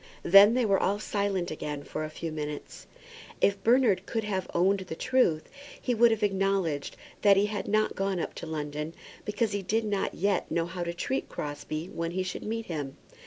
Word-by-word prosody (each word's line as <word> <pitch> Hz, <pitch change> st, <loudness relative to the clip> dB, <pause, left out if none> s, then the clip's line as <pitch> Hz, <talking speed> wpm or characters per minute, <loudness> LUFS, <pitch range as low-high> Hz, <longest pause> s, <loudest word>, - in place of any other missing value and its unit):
Then 200 Hz, +5 st, +8 dB
they 250 Hz, -2 st, +2 dB
were 195 Hz, -2 st, +3 dB
all 200 Hz, +2 st, +1 dB
silent 200 Hz, -4 st, -1 dB
again 150 Hz, -2 st, -4 dB
for 155 Hz, -, -4 dB
a 155 Hz, -, -4 dB
few 160 Hz, +1 st, -5 dB
minutes. 150 Hz, -1 st, -6 dB, 0.5 s
If 200 Hz, -, +2 dB
Bernard 225 Hz, -6 st, +3 dB
could 225 Hz, -1 st, -1 dB
have 195 Hz, -3 st, -2 dB
owned 195 Hz, +3 st, +3 dB
the 180 Hz, -4 st, -6 dB
truth, 170 Hz, -9 st, +2 dB, 0.3 s
he 250 Hz, -, -1 dB
would 235 Hz, +1 st, +6 dB
have 225 Hz, -2 st, 0 dB
acknowledged 195 Hz, -6 st, 0 dB, 0.2 s
that 200 Hz, -1 st, +6 dB
he 200 Hz, -, +4 dB
had 210 Hz, -1 st, -3 dB
not 215 Hz, +1 st, +2 dB
gone 195 Hz, -1 st, -1 dB
up -, -, -3 dB
to -, -, -6 dB
London, 150 Hz, +1 st, -4 dB, 0.3 s
because 210 Hz, +1 st, 0 dB
he 200 Hz, -1 st, -1 dB
did 220 Hz, +4 st, 0 dB
not 200 Hz, -2 st, -1 dB
yet 200 Hz, 0 st, 0 dB
know 165 Hz, -1 st, 0 dB
how 175 Hz, +1 st, -4 dB
to 170 Hz, 0 st, -4 dB
treat 265 Hz, +10 st, -2 dB
Crosbie 155 Hz, +2 st, -5 dB
when 165 Hz, 0 st, -2 dB
he 185 Hz, -, +1 dB
should 185 Hz, -, -5 dB
meet 225 Hz, +1 st, -3 dB
him. 145 Hz, -5 st, -5 dB
195 Hz, 200 wpm, -28 LUFS, 165-210 Hz, 0.5 s, Then